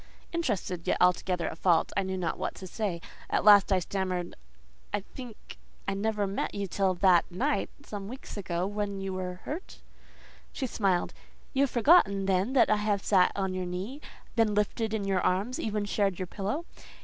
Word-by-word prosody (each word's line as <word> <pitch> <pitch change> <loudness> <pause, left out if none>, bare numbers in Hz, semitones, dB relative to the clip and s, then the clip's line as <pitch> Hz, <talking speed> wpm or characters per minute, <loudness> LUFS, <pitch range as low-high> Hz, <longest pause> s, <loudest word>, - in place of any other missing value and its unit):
Interested, 205 - -2
yet - - +2
altogether 180 -1 +2
at 160 - -6
fault, 170 -3 +3
I - - +2
knew 190 0 -3
not 180 -2 -2
what - - -3
to 190 - -9
say. 185 -3 -3 0.3
At - - +1
last 205 -1 +7
I 190 - +5
stammered, 185 -1 -2 0.6
"I 205 - -1
think 240 +2 -11 0.3
I 195 - +1
never 210 +1 0
met 195 +1 -3
you 200 -1 -1
till 190 0 0
that 175 -1 +4
night, 270 +11 0 0.2
some 200 -2 -6
weeks 255 +5 -8
ago, 175 -3 -2
when 205 0 -3
you 195 0 -3
were 180 -1 -5
hurt…?" 330 +6 -6 0.7
She 270 - -3
smiled. 195 -7 0 0.4
"You 270 - +2
have 280 - +3
forgotten 230 - +4
then 195 +5 +1
that 255 -5 +5
I 215 - +4
have 210 -1 0
sat 185 -3 +4
on 190 -1 -1
your 185 -1 -3
knee, 195 +11 -5 0.3
been 225 -2 +3
lifted 215 +2 0
in 210 - -2
your 195 -1 +1
arms, 200 +8 0
even 210 -2 -1
shared 200 -2 0
your 185 - -3
pillow? 210 - -3
195 Hz, 185 wpm, -29 LUFS, 185-215 Hz, 0.7 s, last